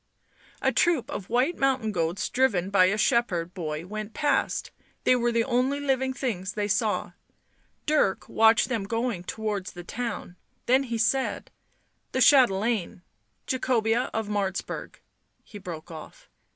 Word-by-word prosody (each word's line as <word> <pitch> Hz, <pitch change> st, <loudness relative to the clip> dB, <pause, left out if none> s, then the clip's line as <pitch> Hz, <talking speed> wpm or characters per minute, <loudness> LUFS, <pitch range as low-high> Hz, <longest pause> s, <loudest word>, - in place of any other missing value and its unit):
A -, -, +3 dB
troop 290 Hz, -7 st, +1 dB
of 200 Hz, -9 st, -6 dB
white 255 Hz, +9 st, +1 dB
mountain 265 Hz, -5 st, +1 dB
goats 170 Hz, -1 st, -1 dB
driven 200 Hz, -8 st, +1 dB
by 185 Hz, -2 st, +6 dB
a 195 Hz, +3 st, +1 dB
shepherd 180 Hz, -7 st, +1 dB
boy 155 Hz, -3 st, -4 dB
went 215 Hz, +2 st, -6 dB
past, 295 Hz, -1 st, 0 dB, 0.3 s
they 255 Hz, -, +5 dB
were 240 Hz, -1 st, +1 dB
the 230 Hz, 0 st, +2 dB
only 260 Hz, +3 st, +1 dB
living 265 Hz, -2 st, 0 dB
things 210 Hz, -8 st, -3 dB
they 205 Hz, -1 st, -1 dB
saw. 210 Hz, +1 st, 0 dB, 0.7 s
Dirk 295 Hz, -11 st, +1 dB
watched 225 Hz, +1 st, +4 dB
them 230 Hz, -6 st, -2 dB
going 225 Hz, -3 st, -2 dB
towards 210 Hz, -1 st, -4 dB
the 175 Hz, -, -9 dB
town, 220 Hz, -3 st, -5 dB, 0.3 s
then 260 Hz, +3 st, +3 dB
he 235 Hz, -2 st, -3 dB
said: 260 Hz, +5 st, 0 dB, 0.3 s
" -, -, -45 dB
The 260 Hz, -, 0 dB
chatelaine... 225 Hz, -8 st, +3 dB, 0.4 s
Jacobea 245 Hz, -2 st, +1 dB
of 220 Hz, -1 st, -2 dB
Martz 200 Hz, -2 st, -1 dB
burg -, -, -7 dB, 0.2 s
" -, -, -47 dB
he 205 Hz, -, -11 dB
broke 175 Hz, -3 st, -8 dB
off. 160 Hz, -, -11 dB
220 Hz, 150 wpm, -26 LUFS, 195-255 Hz, 0.7 s, by